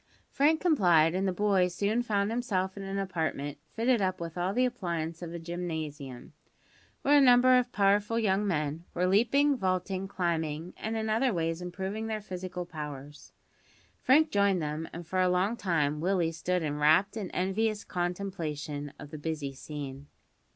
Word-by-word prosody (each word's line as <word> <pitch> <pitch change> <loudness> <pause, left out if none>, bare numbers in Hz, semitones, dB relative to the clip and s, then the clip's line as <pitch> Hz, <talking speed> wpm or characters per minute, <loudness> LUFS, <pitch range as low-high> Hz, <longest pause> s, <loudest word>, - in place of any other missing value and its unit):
Frank 310 +3 +3
complied, 175 - +4
and 190 +2 0
the - - +2
boy 195 -1 +2
soon 200 +6 0
found 205 -3 0
himself 190 -6 -1
in 200 - -7
an 195 0 -4
apartment 160 -7 -2 0.2
fitted 235 0 +2
up 185 -1 0
with 165 -1 -6
all 180 +1 0
the 250 +5 +2
appliances 170 -9 -3
of 170 -2 -6
a 170 - -5
gymnasium, 160 -6 -6 0.7
where 290 +1 +6
a - - +5
number 255 0 +6
of 250 -1 +2
powerful 205 +2 +2
young 205 -2 +1
men 155 -2 -1
were 180 - +1
leaping, 245 +9 +3
vaulting, 185 -2 -1
climbing, 165 -3 -2
and 225 +1 -3
in 220 0 -2
other 230 +4 +2
ways 165 -2 -1
improving 190 +5 -4
their 220 -1 -2
physical 185 -3 -6
powers. 150 -3 -8 0.7
Frank 305 +4 +4
joined 200 -2 +3
them, 155 +1 -3
and 170 +1 -8
for 185 +3 0
a 185 - +3
long 185 +5 +1
time 150 -8 0
Willie 175 -2 +1
stood 175 +2 -1
in 150 -1 -2
rapt 155 +8 +4
and 205 -5 -4
envious 205 +3 0
contemplation 165 -6 -4
of 145 0 -11
the 155 - -7
busy 150 -3 -3
scene. 140 0 -7
185 Hz, 170 wpm, -29 LUFS, 160-210 Hz, 0.7 s, where